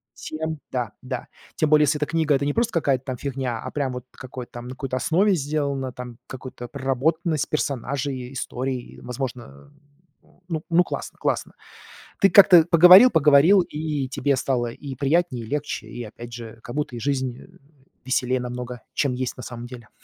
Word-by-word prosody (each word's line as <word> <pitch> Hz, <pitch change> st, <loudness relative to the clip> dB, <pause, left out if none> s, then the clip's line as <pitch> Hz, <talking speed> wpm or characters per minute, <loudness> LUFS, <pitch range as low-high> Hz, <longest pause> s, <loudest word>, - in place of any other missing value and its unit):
тем, 160 Hz, -1 st, -5 dB
да, 120 Hz, -5 st, -2 dB
да. 130 Hz, 0 st, -5 dB, 0.3 s
Тем 155 Hz, -, +2 dB
более, 150 Hz, 0 st, +6 dB
если 150 Hz, +1 st, +2 dB
эта 150 Hz, -, +1 dB
книга- 160 Hz, -2 st, +1 dB
это 140 Hz, -, 0 dB
не 145 Hz, -, 0 dB
просто 235 Hz, 0 st, +1 dB
какая-то 140 Hz, -6 st, +1 dB
там 130 Hz, -2 st, -4 dB
фигня, 130 Hz, -3 st, -3 dB
а -, -, -5 dB
прям 140 Hz, -3 st, -1 dB
вот 125 Hz, 0 st, -7 dB
какой-то 130 Hz, -1 st, -9 dB
там 120 Hz, -, -7 dB
на -, -, -7 dB
какой-то 130 Hz, 0 st, -4 dB
основе 185 Hz, +8 st, +2 dB
сделана, 140 Hz, -3 st, -2 dB
там 125 Hz, -1 st, -9 dB
какую-то 125 Hz, -2 st, -8 dB
проработанность 145 Hz, +4 st, 0 dB
персонажей, 135 Hz, -2 st, -2 dB
историй, 130 Hz, -1 st, -4 dB
возможно, 125 Hz, -, -7 dB, 0.5 s
э, -, -, -29 dB, 0.4 s
ну 170 Hz, +1 st, +5 dB
классно, -, -, -6 dB
классно. -, -, -1 dB, 0.7 s
Ты 195 Hz, -, +6 dB
как-то 185 Hz, -5 st, +8 dB
поговорил-поговорил, 175 Hz, -, +8 dB
и 150 Hz, -4 st, -3 dB
тебе 140 Hz, +1 st, +1 dB
стало 125 Hz, -2 st, 0 dB
и 135 Hz, +2 st, -8 dB
приятнее, 140 Hz, -2 st, 0 dB
и -, -, -12 dB
легче, 145 Hz, -6 st, -3 dB
и 120 Hz, +2 st, -7 dB
опять 120 Hz, +2 st, -10 dB
же, 115 Hz, -1 st, -9 dB
как 120 Hz, -, -8 dB
будто 145 Hz, -4 st, -2 dB
и 120 Hz, -, -5 dB
жизнь, 130 Hz, -1 st, -1 dB
э, -, -, -14 dB, 0.6 s
веселее 130 Hz, 0 st, +1 dB
намного, 125 Hz, -1 st, -6 dB
чем 140 Hz, -3 st, 0 dB
есть 125 Hz, 0 st, -3 dB
на 125 Hz, -, -8 dB
самом 120 Hz, 0 st, -7 dB
деле. 120 Hz, -3 st, -11 dB
135 Hz, 175 wpm, -24 LUFS, 125-150 Hz, 0.7 s, как-то